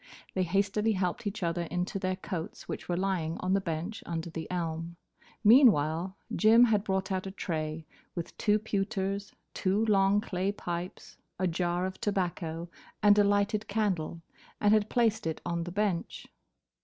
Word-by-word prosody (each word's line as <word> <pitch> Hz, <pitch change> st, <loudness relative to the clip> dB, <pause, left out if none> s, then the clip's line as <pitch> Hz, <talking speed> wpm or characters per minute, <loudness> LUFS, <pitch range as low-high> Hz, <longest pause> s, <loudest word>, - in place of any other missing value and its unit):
They 190 Hz, -, 0 dB
hastily 200 Hz, +4 st, +1 dB
helped 185 Hz, +2 st, -1 dB
each 205 Hz, -1 st, -4 dB
other 170 Hz, 0 st, 0 dB
into 180 Hz, +3 st, -2 dB
their 185 Hz, 0 st, -1 dB
coats, 185 Hz, -3 st, -6 dB
which -, -, -6 dB
were 175 Hz, -, 0 dB
lying 180 Hz, -4 st, -1 dB
on 185 Hz, +1 st, 0 dB
the 195 Hz, -, +3 dB
bench 170 Hz, +5 st, -4 dB
under 165 Hz, 0 st, -3 dB
the 160 Hz, -1 st, -6 dB
elm. 165 Hz, -1 st, -3 dB, 0.5 s
Meanwhile, 190 Hz, -, +5 dB, 0.2 s
Jim 225 Hz, +2 st, +6 dB
had 215 Hz, -4 st, +3 dB
brought 190 Hz, -2 st, -1 dB
out 190 Hz, 0 st, -1 dB
a -, -, -5 dB
tray 160 Hz, -4 st, -3 dB, 0.3 s
with 170 Hz, -2 st, -5 dB
two 210 Hz, -1 st, +3 dB
pewters, 200 Hz, -1 st, -2 dB, 0.2 s
two 200 Hz, +4 st, +1 dB
long 200 Hz, -1 st, +4 dB
clay 195 Hz, -1 st, -2 dB
pipes, 175 Hz, -1 st, -6 dB, 0.2 s
a 185 Hz, -, 0 dB
jar 175 Hz, +1 st, 0 dB
of 190 Hz, 0 st, -6 dB
tobacco 175 Hz, -4 st, -2 dB, 0.4 s
and 205 Hz, 0 st, +7 dB
a -, -, +7 dB
lighted 205 Hz, +1 st, +1 dB
candle, 185 Hz, -6 st, -1 dB, 0.4 s
and 210 Hz, 0 st, +4 dB
had 215 Hz, 0 st, +3 dB
placed 225 Hz, -7 st, +2 dB
it 160 Hz, -, -2 dB
on 170 Hz, -1 st, -2 dB
the 175 Hz, -, -5 dB
bench. 195 Hz, -3 st, -1 dB
190 Hz, 165 wpm, -30 LUFS, 170-205 Hz, 0.5 s, and